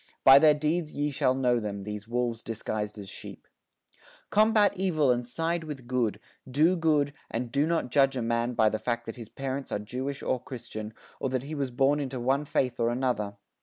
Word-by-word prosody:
By 135 +1 +10
their 150 0 +6
deeds 155 +2 -1
ye 145 +1 0
shall 130 -1 +2
know 125 -2 +2
them, 100 -2 -4
these 105 +1 -6
wolves 120 -1 -1
disguised 110 -2 -4
as 100 -2 -8
sheep. - - -9 0.8
Combat 215 -1 +4
evil 165 -8 +2
and 120 0 +1
side 165 +7 -2
with 145 -5 -7
good, 120 -5 0 0.3
do 155 +7 +4
good, 150 -4 +2 0.2
and 120 0 -3
do 140 +4 +2
not 165 -7 0
judge 135 -1 +3
a 120 - -1
man 115 +1 0
by 110 - +4
the 110 - -2
fact 120 +1 -2
that 115 - -6
his 115 -3 -9
parents 135 0 -4
are - - 0
Jewish 130 +7 -5
or 130 - 0
Christian, 110 -4 -7 0.2
or 135 - -1
that 130 -1 -1
he 145 +3 -7
was 140 -3 -1
born 135 +4 +2
into 135 -3 -3
one 135 +4 +1
faith 125 -3 0
or 115 0 +2
another. 120 -5 -1
130 Hz, 205 wpm, -28 LUFS, 115-145 Hz, 0.8 s, By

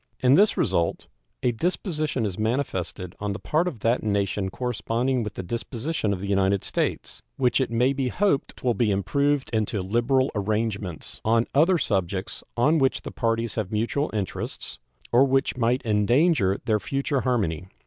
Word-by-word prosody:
In 130 0 +4
this 205 +8 +5
result 90 -7 0 0.4
a 125 - +3
disposition 155 - -1
is 95 -2 -4
manifested 110 -6 -2
on 105 -1 -2
the 100 - -6
part 160 +4 0
of 125 - -5
that 115 +2 +2
nation 100 -2 0
corresponding 120 +3 -1
with 105 -3 -5
the - - -5
disposition 115 - -3
of 100 - -2
the 100 - -5
United 100 0 +2
States, - - -2 0.2
which 130 0 +2
it 130 - 0
may 125 +4 +2
be 135 -2 -1
hoped 185 +1 0
will 125 -2 +2
be 115 -2 +1
improved 140 +8 +1
into 110 -1 0
liberal 120 +7 +1
arrangements 105 -4 -3
on 115 +1 +3
other 170 +6 +4
subjects 95 - -2
on 150 +7 +4
which 135 -1 +1
the - - -6
parties 115 0 -1
have 105 -4 -3
mutual 115 +7 0
interests, 100 -4 -5 0.3
or 120 +3 +6
which 135 0 +1
might 125 +1 +1
endanger 110 - +3
their 110 -3 +2
future 135 +5 -1
harmony. 100 -10 -1
115 Hz, 165 wpm, -25 LUFS, 100-135 Hz, 0.4 s, or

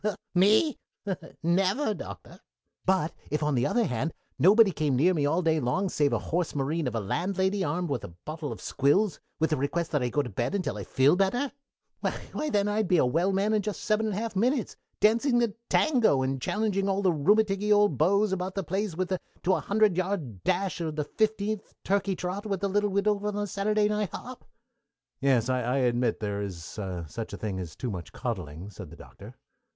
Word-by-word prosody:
me? 210 - +4 0.6
never, 195 - +2
Doctor! - - -9 0.5
"But 185 -4 +2 0.2
if, 150 +1 -1
on 150 0 +1
the 120 -2 +2
other 240 - +2
hand, 125 - -2 0.2
nobody 200 - +6
came 150 -4 0
near 170 +9 +4
me 145 -4 +1
all 165 +5 +1
day 160 -1 +2
long 170 +10 0
save 145 -4 +1
a - - +2
horse 170 -1 -2
marine 145 +2 -1
of 120 - -3
a - - +1
landlady 190 - 0
armed 165 +1 -1
with 125 -5 -2
a - - -5 0.2
bottle 155 -1 -5
of - - -7
squills, 150 +6 +2 0.2
with 160 +1 +1
the 155 - +2
request 160 +5 -1
that 145 -4 +1
I 125 - 0
go 145 +3 +1
to 125 - -6
bed 140 - -1
until 155 - -2
I 100 - -6
felt 140 +7 +3
better, 245 +8 +1 0.5
why 305 - -3
then 205 -5 +1
I'd 210 0 0
be 180 - +3
a 150 - +4
well 165 +10 +2
man 200 +3 +1
in 215 - +3
just 210 0 -4
seven 220 0 +1
and 210 - -2
a - - -3
half 225 -1 -3
minutes, 245 +5 +1 0.2
dancing 235 +4 +3
the 235 -3 +1 0.2
tango, 235 - +3
and 135 0 -2
challenging 200 - 0
all 195 +1 0
the 185 -2 +4
rheumaticky 205 +6 +2
old 205 0 +4
beaux 200 +6 +4
about 185 0 -3
the 195 - -1
place 190 +1 -2
to 185 +1 -2
a - - +1
hundred 210 -2 +2
yards' 175 - -2
dash 185 0 0
for 165 -2 -1
the 150 -1 -2
fifteenth 215 +4 -1
turkey 195 0 +1
trot 185 +4 -4
with 195 -3 -2
the 200 - 0
little 205 +1 +1
widow 200 +1 +1
at 210 - -2
the 205 0 -1
Saturday 210 +2 +1
night 210 -2 -1
hop." 255 0 -8 0.7
"Yes, 130 -4 +2
I 125 0 0
admit 125 -1 +1
that - - -1
there 100 0 -2
is 95 -5 -5 0.4
such 110 +9 -6
a - - -4
thing 100 -3 -3
as 85 -4 -7
too 125 - -4
much 90 -4 -7
coddling," 90 - -5
said 95 -5 -9
the 85 - -12
Doctor. - - -13
185 Hz, 210 wpm, -28 LUFS, 140-205 Hz, 0.7 s, nobody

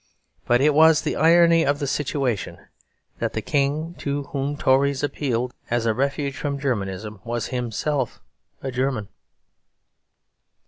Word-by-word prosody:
But 120 +1 +4
it 150 +1 +4
was 160 +1 +6
the - - -1
irony 165 +1 +5
of 145 -1 +1
the 145 - -3
situation 135 -5 -2 0.6
that - - -2
the 110 - -2
King 150 +5 0
to 140 0 -2
whom 140 +1 -2
Tories 135 +1 +2
appealed 125 -4 -1 0.2
as 120 -1 0
a 115 - +2
refuge 140 +3 -1
from 140 -1 -2
Germanism 105 -6 -3
was 120 -1 -3
himself 125 +2 -2 0.4
a 135 - -3
German. 125 -5 -1
140 Hz, 135 wpm, -23 LUFS, 120-145 Hz, 0.6 s, was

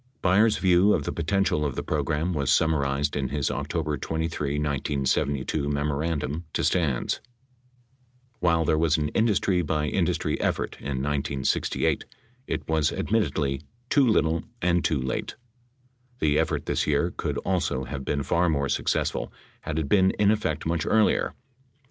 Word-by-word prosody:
Byers' 105 +4 +4
view 95 +2 +4
of 75 - -2
the - - -2
potential 85 -1 0
of 70 -3 -2
the - - -3
program 80 +5 -1
was 70 -4 0
summarized 70 -2 +1
in 70 -3 -1
his 70 -1 -1
October - - -2
23, 80 -3 -2
1972, 70 0 -1
memorandum 75 +1 -1
to - - 0
Stans: 75 -9 0 1.2
While 85 -3 +2
there 80 0 +2
was 80 -1 +3
an 75 -1 -1
industry 100 -3 +2
by 75 -2 -1
industrv - - 0
effort - - -1
in 65 -2 -3
1968, 70 -1 0 0.4
it - - -3
was 80 -2 +2
admittedly, 75 -11 0 0.3
"too 140 -2 +5
little 80 -7 +2 0.2
and 90 -1 +2
too 75 - +1
late." 65 0 -3 0.8
The 75 -8 +2
effort - - -1
this - - 0
year 75 +4 +1
could - - -2
also 90 -8 -1
have 65 +1 -5
been 70 +1 -1
far 85 +4 +2
more 70 -3 0
successful - - -1 0.3
had 75 - -4
it 80 -3 -1
been 95 +3 +4
in 105 0 +4
effect 80 -9 -1
much 80 -1 0
earlier. 110 -1 +2
75 Hz, 150 wpm, -26 LUFS, 70-90 Hz, 1.2 s, too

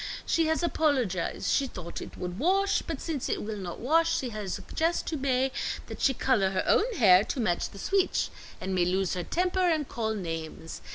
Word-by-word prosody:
She 330 -1 +2
has 320 +2 +1
apologize. 260 - 0
She 275 - +2
thought 170 -7 -7
it - - -9
would 180 +1 -5
wash, 390 +6 +2
but 325 -5 -5
since 305 -6 -3
it - - -1
will 210 0 -4
not 175 -3 -6
wash, 330 +6 +3
she 255 - -2
has 210 -4 -4
suggest 330 +2 -1
to 320 - -2
Mae 265 -2 +1 0.3
that - - -8
she 270 - +3
color 210 -8 +2
her 190 -1 -1
own 470 +4 +3
hair 190 -5 +6
to - - -3
match 175 -7 0
the - - -13
sweetch, 385 - +1 0.3
and 190 +1 -3
Mae 180 -1 +3
lose 185 +1 0
her 180 - -2
temper 360 - +1
and 310 -4 0
call 220 -2 -2
names. 165 -3 -5
250 Hz, 205 wpm, -28 LUFS, -, 0.3 s, hair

